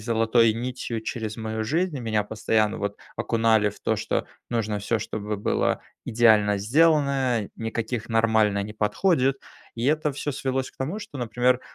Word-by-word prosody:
золотой 115 Hz, 0 st, +3 dB
нитью 120 Hz, -1 st, -4 dB
через 110 Hz, -1 st, -4 dB
мою 110 Hz, -1 st, -3 dB
жизнь. 160 Hz, +6 st, 0 dB
Меня 110 Hz, -3 st, 0 dB
постоянно, 110 Hz, 0 st, 0 dB
вот, 100 Hz, 0 st, -3 dB, 0.2 s
окунали 110 Hz, -2 st, +2 dB
в 100 Hz, -, -10 dB
то, 110 Hz, -, 0 dB
что 110 Hz, +1 st, -2 dB, 0.2 s
нужно 110 Hz, -3 st, -1 dB
всё 115 Hz, +2 st, 0 dB
чтобы 105 Hz, -1 st, -4 dB
было 100 Hz, -, 0 dB, 0.2 s
идеально 110 Hz, -3 st, +4 dB
сделано, 135 Hz, -2 st, +2 dB
никаких 115 Hz, 0 st, -3 dB
"нормально" 110 Hz, -3 st, +2 dB
не 105 Hz, -, -7 dB
подходит. 135 Hz, -, +1 dB, 0.4 s
И 115 Hz, -, -3 dB
это 150 Hz, +1 st, +2 dB
всё 145 Hz, +1 st, -4 dB
свелось 135 Hz, -1 st, -2 dB
к -, -, -32 dB
тому, 155 Hz, +11 st, -3 dB
что, 145 Hz, -9 st, -9 dB
например, 125 Hz, +2 st, +1 dB
115 Hz, 155 wpm, -25 LUFS, 110-130 Hz, 0.4 s, идеально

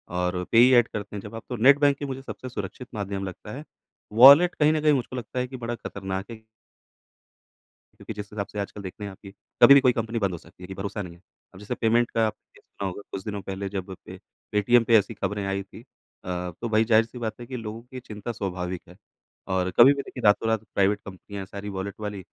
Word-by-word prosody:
और 90 Hz, 0 st, -1 dB
payee 120 Hz, +3 st, +7 dB
add 120 Hz, -1 st, +5 dB
करते 105 Hz, 0 st, -6 dB
हैं 100 Hz, -, -5 dB
जब 110 Hz, +2 st, -9 dB
आप 115 Hz, -, -7 dB
तो 125 Hz, -, -3 dB
नेट 135 Hz, +5 st, +6 dB
बैंकिंग 145 Hz, -1 st, +2 dB
मुझे 135 Hz, 0 st, -5 dB
सबसे 130 Hz, -1 st, -8 dB
सुरक्षित 115 Hz, +3 st, -6 dB
माध्यम 100 Hz, -2 st, -4 dB
लगता 95 Hz, +3 st, -9 dB
है, 145 Hz, -, -8 dB, 0.5 s
वॉलेट 140 Hz, +10 st, +9 dB
कहीं 150 Hz, +1 st, +3 dB
न 155 Hz, -, 0 dB
कहीं 150 Hz, 0 st, +4 dB
मुझको 130 Hz, -2 st, -2 dB
लगता 125 Hz, 0 st, -5 dB
है 125 Hz, -, -1 dB
कि 130 Hz, -, -8 dB
बड़ा 120 Hz, -1 st, -4 dB
ख़तरनाक 95 Hz, -3 st, -5 dB
है 110 Hz, -1 st, -11 dB, 1.6 s
क्योंकि -, -, -7 dB
जिस 105 Hz, -1 st, -7 dB
हिसाब 100 Hz, -2 st, -3 dB
से 105 Hz, -, -7 dB
आजकल 100 Hz, +1 st, -5 dB
देखते 95 Hz, +2 st, -8 dB
हैं 100 Hz, -, -5 dB
आप 95 Hz, -, -15 dB
कि 100 Hz, -, -11 dB, 0.3 s
कभी 140 Hz, 0 st, +10 dB
कोई 130 Hz, -2 st, +5 dB
कंपनी 115 Hz, 0 st, -2 dB
बंद 100 Hz, -3 st, 0 dB
हो 85 Hz, -, -4 dB
सकती 85 Hz, +3 st, -17 dB
है -, -, -8 dB
कि 95 Hz, -, -7 dB
भरोसा 100 Hz, +2 st, -4 dB
नहीं 90 Hz, -3 st, -8 dB
है। 85 Hz, -, -22 dB, 0.3 s
अब 95 Hz, -, -13 dB
जैसे 105 Hz, +4 st, -4 dB
पेमेंट 120 Hz, +1 st, +2 dB
का 115 Hz, -1 st, +2 dB
आपने 110 Hz, -, -10 dB
सुना 100 Hz, -, -6 dB
होगा 95 Hz, +2 st, -6 dB
कुछ 95 Hz, -, -5 dB
दिनों 105 Hz, -1 st, -4 dB
पे 95 Hz, -, -7 dB
पहले 95 Hz, +1 st, -4 dB
जब 95 Hz, -1 st, -5 dB
पे -, -, -9 dB, 0.3 s
पेटीएम 115 Hz, +3 st, +4 dB
ऐसी 105 Hz, +2 st, 0 dB
ख़बरें 100 Hz, 0 st, -3 dB
आई 100 Hz, 0 st, -2 dB
थी 95 Hz, -, -14 dB
अ, 90 Hz, 0 st, -8 dB
तो 120 Hz, -, -2 dB
भई 110 Hz, 0 st, +3 dB
ज़ाहिर-सी 115 Hz, +1 st, +2 dB
बात 115 Hz, -1 st, -4 dB
है 120 Hz, -, -8 dB
कि 130 Hz, -, -5 dB
लोगों 110 Hz, 0 st, -6 dB
की 130 Hz, +1 st, -9 dB
चिंता 105 Hz, -1 st, -7 dB
स्वाभाविक 90 Hz, -4 st, -4 dB
है -, -, -14 dB, 0.6 s
और 90 Hz, -1 st, +1 dB
कभी 130 Hz, +4 st, +9 dB
भी 140 Hz, -, -3 dB
देखिए 125 Hz, -, -9 dB
रातों-रात 110 Hz, +1 st, +3 dB
प्राइवेट 100 Hz, +1 st, +3 dB
कंपनियाँ 100 Hz, +1 st, -8 dB
है -, -, -9 dB
सारी 100 Hz, +1 st, -7 dB
वॉलेट 100 Hz, 0 st, -5 dB
वाली 105 Hz, -1 st, -5 dB
105 Hz, 235 wpm, -25 LUFS, 95-120 Hz, 1.6 s, कभी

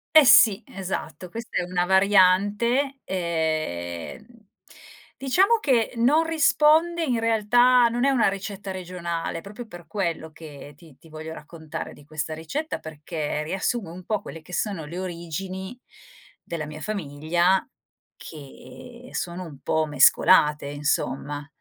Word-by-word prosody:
Eh 310 Hz, -2 st, +9 dB
sì, 225 Hz, -3 st, +7 dB
esatto 190 Hz, -, -6 dB
questa 230 Hz, +5 st, -6 dB
è -, -, -1 dB
una 175 Hz, 0 st, -1 dB
variante, 205 Hz, +8 st, +3 dB
ehm, 155 Hz, -, -3 dB, 0.9 s
diciamo 380 Hz, -, +3 dB
che 255 Hz, -, +1 dB
non 280 Hz, +8 st, +4 dB
risponde 325 Hz, +1 st, +3 dB
in 250 Hz, -7 st, 0 dB
realtà 235 Hz, +2 st, +4 dB
non 240 Hz, +2 st, -1 dB
è 275 Hz, -, +4 dB
una 265 Hz, -4 st, +3 dB
ricetta 195 Hz, 0 st, -4 dB
regionale, 175 Hz, -3 st, -4 dB
proprio 210 Hz, +5 st, -9 dB
per 175 Hz, -4 st, -12 dB
quello 165 Hz, -3 st, -3 dB
che 150 Hz, -2 st, -11 dB
ti 150 Hz, -2 st, -18 dB
ti 160 Hz, +3 st, -19 dB
voglio 155 Hz, +1 st, -8 dB
raccontare 160 Hz, 0 st, -8 dB
di 145 Hz, -, -16 dB
questa 155 Hz, +1 st, -5 dB
ricetta 220 Hz, -, -4 dB
perché 150 Hz, -1 st, -4 dB
riassume 190 Hz, +3 st, -2 dB
un 180 Hz, +1 st, -11 dB
po' 215 Hz, +1 st, 0 dB
quelle 165 Hz, -6 st, -9 dB
che 180 Hz, +3 st, -14 dB
sono 185 Hz, -6 st, -2 dB
le 170 Hz, +4 st, -8 dB
origini 185 Hz, +5 st, -6 dB, 0.6 s
della 165 Hz, -2 st, -5 dB
mia 150 Hz, +1 st, -9 dB
famiglia 175 Hz, 0 st, 0 dB, 0.5 s
che 155 Hz, -, -12 dB
sono 175 Hz, +1 st, -4 dB
un 145 Hz, -5 st, -11 dB
po' 160 Hz, +3 st, 0 dB
mescolate, 150 Hz, +1 st, +4 dB
insomma, 145 Hz, 0 st, -2 dB
180 Hz, 135 wpm, -24 LUFS, 155-230 Hz, 0.9 s, Eh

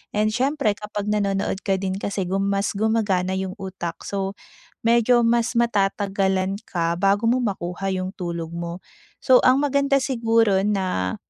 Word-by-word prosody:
And 210 Hz, +1 st, +2 dB
syempre, 265 Hz, 0 st, +1 dB
kapag 210 Hz, -1 st, -5 dB
nanonood 195 Hz, -2 st, 0 dB
ka 195 Hz, -, +1 dB
din 190 Hz, 0 st, -2 dB
kasi 200 Hz, -1 st, -2 dB
gum 195 Hz, +2 st, 0 dB
mas 200 Hz, +1 st, 0 dB
gumagana 200 Hz, -4 st, +1 dB
yung 190 Hz, -1 st, -3 dB
utak, 185 Hz, -3 st, -6 dB
so 195 Hz, 0 st, -3 dB, 0.5 s
medyo 235 Hz, +1 st, +4 dB
mas 235 Hz, +1 st, +1 dB
matatagalan 195 Hz, -3 st, 0 dB
ka 170 Hz, -1 st, -1 dB
bago 200 Hz, +3 st, +2 dB
mo 255 Hz, -, +2 dB
makuha 195 Hz, -4 st, -3 dB
'yung 185 Hz, 0 st, -3 dB
tulog 170 Hz, -2 st, -5 dB
mo. 170 Hz, +1 st, -6 dB, 0.4 s
So 255 Hz, -2 st, +6 dB
ang 260 Hz, +3 st, +4 dB
maganda 280 Hz, 0 st, +2 dB
siguro 230 Hz, -6 st, +2 dB
na 185 Hz, -, -1 dB
200 Hz, 150 wpm, -23 LUFS, 190-230 Hz, 0.5 s, So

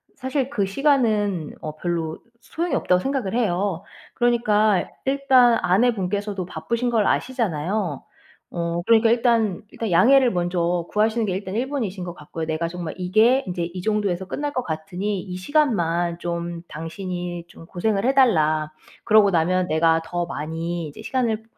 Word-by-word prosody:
사실 265 Hz, 0 st, -2 dB
그 205 Hz, -8 st, 0 dB
시간은 210 Hz, -, +1 dB
어 155 Hz, -1 st, -6 dB
별로 165 Hz, -2 st, -3 dB, 0.2 s
소용이 340 Hz, +2 st, -3 dB
없다.'고 180 Hz, 0 st, +2 dB
생각을 265 Hz, -4 st, -2 dB
해요. 195 Hz, -5 st, 0 dB, 0.3 s
그러니까 215 Hz, -5 st, +2 dB, 0.2 s
일단 265 Hz, -3 st, +4 dB
아내분께서도 200 Hz, -1 st, 0 dB
바쁘신 235 Hz, +6 st, -2 dB
걸 220 Hz, -3 st, +2 dB
아시잖아요. 190 Hz, -, -1 dB, 0.5 s
어 170 Hz, 0 st, -1 dB
그러니까 225 Hz, 0 st, +5 dB
일단 230 Hz, -5 st, +2 dB
일단 225 Hz, -, -4 dB
양해를 255 Hz, +7 st, +5 dB
먼저 175 Hz, -1 st, 0 dB
구하시는 220 Hz, +2 st, +1 dB
게 190 Hz, -, -1 dB
일단 190 Hz, +1 st, -4 dB
1 255 Hz, +3 st, -1 dB
번이신 210 Hz, -10 st, -3 dB
것 175 Hz, -1 st, -6 dB
같고요. 160 Hz, 0 st, -6 dB
"내가 160 Hz, +1 st, -2 dB
정말 170 Hz, -2 st, -5 dB
이게 220 Hz, +9 st, +3 dB
이제 175 Hz, -1 st, -2 dB
이 175 Hz, +2 st, -5 dB
정도에서 200 Hz, -3 st, -1 dB
끝날 290 Hz, +4 st, -3 dB
것 255 Hz, -, -1 dB
같으니 180 Hz, +5 st, -3 dB
이 180 Hz, -2 st, -7 dB
시간만 175 Hz, -, +1 dB
좀 170 Hz, -1 st, -4 dB
당신이 175 Hz, +1 st, -5 dB
좀 165 Hz, -, -14 dB
고생을 195 Hz, +5 st, -1 dB
해 265 Hz, -, +3 dB
달라. 155 Hz, -, +3 dB, 0.3 s
그리고 210 Hz, -2 st, +5 dB
나면 180 Hz, +2 st, +1 dB
내가 165 Hz, +1 st, +3 dB
더 175 Hz, 0 st, -2 dB
많이 165 Hz, +2 st, -4 dB
이제 145 Hz, -, -11 dB
시간을 230 Hz, -4 st, -1 dB
190 Hz, 330 characters per minute, -23 LUFS, 170-230 Hz, 0.5 s, 그러니까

